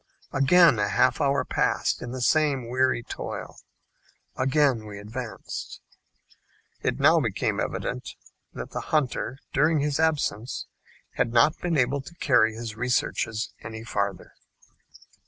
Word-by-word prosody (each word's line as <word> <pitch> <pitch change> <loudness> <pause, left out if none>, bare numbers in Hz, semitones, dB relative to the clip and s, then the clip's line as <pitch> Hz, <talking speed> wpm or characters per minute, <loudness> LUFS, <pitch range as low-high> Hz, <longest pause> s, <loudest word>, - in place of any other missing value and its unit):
Again 140 -1 +5
a 105 0 +1
half 130 +7 +2
hour 140 0 +2
passed - - 0
in 125 - -5
the 130 0 -5
same 140 -2 +2
weary 130 -1 +1
toil. - - -6 0.8
Again 130 -4 +2
we 100 -1 -8
advanced. 105 +2 -7 1.0
It - - -1
now - - +6
became - - -1
evident - - -3 0.4
that - - -7
the - - -3
hunter, 135 -3 -1 0.2
during 155 +3 +3
his 145 +1 0
absence, 140 -8 0 0.5
had 125 -2 +1
not 125 +7 +4
been 170 -3 0
able 135 +2 +1
to 170 +6 -13
carry 110 -8 +3
his 115 -2 -6
researches 115 -2 -1
any 110 0 -7
farther. 100 -5 -3
130 Hz, 130 wpm, -26 LUFS, 115-145 Hz, 1.0 s, now